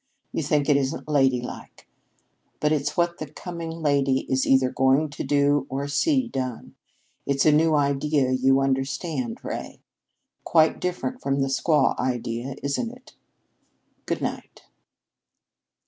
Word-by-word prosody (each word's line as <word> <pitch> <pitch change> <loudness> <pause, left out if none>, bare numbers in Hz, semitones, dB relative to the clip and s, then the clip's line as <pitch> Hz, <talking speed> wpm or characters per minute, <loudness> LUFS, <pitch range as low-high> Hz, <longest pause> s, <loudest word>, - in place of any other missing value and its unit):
You - - -1
think 145 -1 +1
it 145 -2 +4
isn't 135 +1 -2
ladylike. 135 -4 -1 0.7
But 150 - +1
it's 145 -2 -1
what 170 0 +1
the 155 - -5
coming 170 +2 -7
lady 140 -2 +2
is 130 0 -1
either 130 -1 +4
going 135 +4 +2
to - - -5
do 145 0 +2
or 140 +2 -3
see 260 - +1
done. 130 - -5 0.5
It's 140 0 +1
a 155 - +6
new 155 +1 +3
idea, 140 -1 +1
you 135 +1 +3
understand, 135 -1 -2
Ray. - - -6 0.6
Quite 160 -1 +3
different 180 +8 -3
from 140 0 0
the 135 - 0
squaw 145 +1 +2
idea, 125 0 -2
isn't 140 - -1
it? 250 +1 -16 0.9
Good - - -2
night!" - - -5
140 Hz, 135 wpm, -24 LUFS, 135-155 Hz, 0.9 s, a